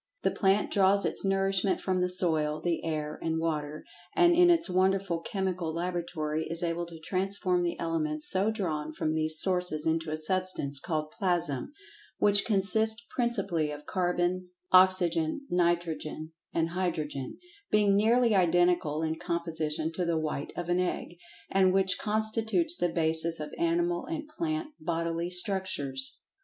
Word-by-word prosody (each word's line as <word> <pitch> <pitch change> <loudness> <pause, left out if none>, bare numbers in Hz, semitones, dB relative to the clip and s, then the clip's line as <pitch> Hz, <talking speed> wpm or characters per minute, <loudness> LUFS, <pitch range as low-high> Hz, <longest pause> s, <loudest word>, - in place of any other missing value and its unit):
The - - +2
plant 195 +1 +1
draws 200 0 +3
its - - 0
nourishment 195 0 +1
from 185 -1 -1
the 180 - +1
soil, 160 -4 +1
the 170 +1 -2
air, 155 -2 -3
and 160 0 -1
water, 155 -2 -3 0.3
and 345 0 +5
in 355 0 +6
its 335 -1 +4
wonderful 190 -1 +1
chemical 185 -2 -3
laboratory 170 -2 -3
is 165 +2 0
able 170 0 -2
to 170 -1 -11
transform 185 +1 0
the 175 -1 -2
elements 155 -2 -2
so 195 +3 +1
drawn 155 -8 -3
from 155 0 -2
these 155 0 +1
sources 180 -5 0
into 160 0 0
a 155 - -2
substance 155 -4 0
called 155 0 -3
"Plasm," 175 - 0 0.5
which 205 -1 +3
consists 220 +2 +2
principally 200 - 0
of 150 0 -8
carbon, 180 0 -1 0.2
oxygen, 185 - +4
nitrogen 170 -3 -1 0.2
and 165 0 0
hydrogen, 155 -7 -3 0.3
being 205 -2 +3
nearly 230 +3 +3
identical 175 -4 +2
in 160 0 -2
composition 160 -2 -2
to 180 +2 -3
the 170 -1 0
white 150 -2 -3
of 175 - -4
an 175 +1 +1
egg, 180 -1 -3 0.4
and 190 -1 +3
which 190 -1 +1
constitutes 220 +9 +1
the 175 - 0
basis 165 0 -1
of 150 -1 -7
animal 175 +1 0
and 325 -2 -5
plant 315 0 -3
bodily 165 +1 -2
structures. 180 -8 +2
175 Hz, 150 wpm, -28 LUFS, 160-195 Hz, 0.5 s, in